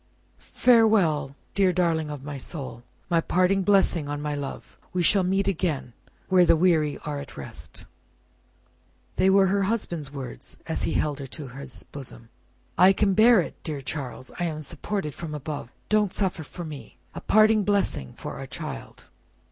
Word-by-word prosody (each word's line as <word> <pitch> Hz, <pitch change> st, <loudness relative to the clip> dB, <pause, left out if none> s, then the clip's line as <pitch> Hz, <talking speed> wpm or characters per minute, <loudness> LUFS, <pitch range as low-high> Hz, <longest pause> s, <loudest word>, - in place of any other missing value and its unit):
"Farewell, 195 Hz, -, +3 dB, 0.2 s
dear 195 Hz, -2 st, +3 dB
darling 165 Hz, -3 st, +1 dB
of 145 Hz, -2 st, -6 dB
my 145 Hz, 0 st, -6 dB
soul. 135 Hz, -3 st, -7 dB, 0.3 s
My 170 Hz, -1 st, +2 dB
parting 185 Hz, +3 st, +2 dB
blessing 190 Hz, -6 st, +3 dB
on 145 Hz, 0 st, -3 dB
my 150 Hz, 0 st, -2 dB
love. 140 Hz, -1 st, -6 dB, 0.2 s
We 180 Hz, -1 st, +1 dB
shall 195 Hz, +3 st, +4 dB
meet 195 Hz, +2 st, +1 dB
again, 160 Hz, -9 st, -1 dB, 0.3 s
where 185 Hz, -1 st, +5 dB
the 170 Hz, -, +5 dB
weary 160 Hz, -4 st, +2 dB
are 150 Hz, -1 st, -3 dB
at 140 Hz, -, -10 dB
rest!" 70 Hz, -, -9 dB, 1.3 s
They 190 Hz, -, +4 dB
were 195 Hz, 0 st, +6 dB
her 200 Hz, +1 st, +2 dB
husband's 175 Hz, -8 st, -2 dB
words, 135 Hz, -, -8 dB
as -, -, -2 dB
he -, -, -1 dB
held 150 Hz, -2 st, 0 dB
her 135 Hz, -, -6 dB
to 140 Hz, 0 st, -8 dB
his 135 Hz, +3 st, -9 dB
bosom. 120 Hz, -4 st, -10 dB, 0.5 s
"I 185 Hz, +2 st, +8 dB
can 200 Hz, 0 st, +2 dB
bear 220 Hz, +1 st, +6 dB
it, -, -, -8 dB
dear 150 Hz, -3 st, -4 dB
Charles. 130 Hz, -2 st, -5 dB
I 175 Hz, -, 0 dB
am 155 Hz, -2 st, -3 dB
supported 155 Hz, +1 st, -2 dB
from 155 Hz, -1 st, -6 dB
above: 145 Hz, -3 st, -5 dB, 0.2 s
don't 210 Hz, -2 st, +2 dB
suffer 190 Hz, -4 st, 0 dB
for 170 Hz, +3 st, -8 dB
me. 150 Hz, -3 st, -9 dB, 0.2 s
A -, -, -7 dB
parting 215 Hz, 0 st, +4 dB
blessing 195 Hz, -, 0 dB
for -, -, -6 dB
our -, -, -6 dB
child." -, -, -8 dB
165 Hz, 170 wpm, -26 LUFS, 145-195 Hz, 1.3 s, I